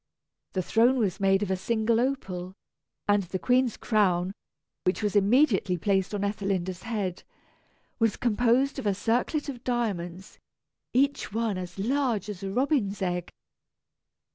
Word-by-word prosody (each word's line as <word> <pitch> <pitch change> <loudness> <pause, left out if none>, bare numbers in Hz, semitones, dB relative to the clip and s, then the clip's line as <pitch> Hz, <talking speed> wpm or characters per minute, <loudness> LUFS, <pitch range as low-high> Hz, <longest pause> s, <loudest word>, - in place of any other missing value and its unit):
The 185 - 0
throne 235 +7 +3
was 195 -5 0
made 195 0 +3
of 195 - -2
a - - +2
single 220 +4 +1
opal, 190 -9 -2 0.5
and 205 0 +4
the 185 0 -4
queen's 250 +2 +2
crown, 190 -4 +1 0.5
which 185 +4 0
was 210 0 0
immediately 205 -3 +3
placed 195 +2 0
on 200 - -2
Ethelinda's 195 -3 -2
head, 205 -6 -3 0.8
was 225 -2 +2
composed 245 +4 +2
of - - -3
a 200 - +2
circlet 245 - 0
of 260 -4 -6
diamonds, 190 -7 -3 0.5
each 275 0 +1
one 225 -1 0
as 180 +1 -7
large 235 -1 0
as 205 -2 -6
a 195 - -3
robin's 245 -3 0
egg. 180 -1 -2
205 Hz, 140 wpm, -27 LUFS, 190-240 Hz, 0.8 s, and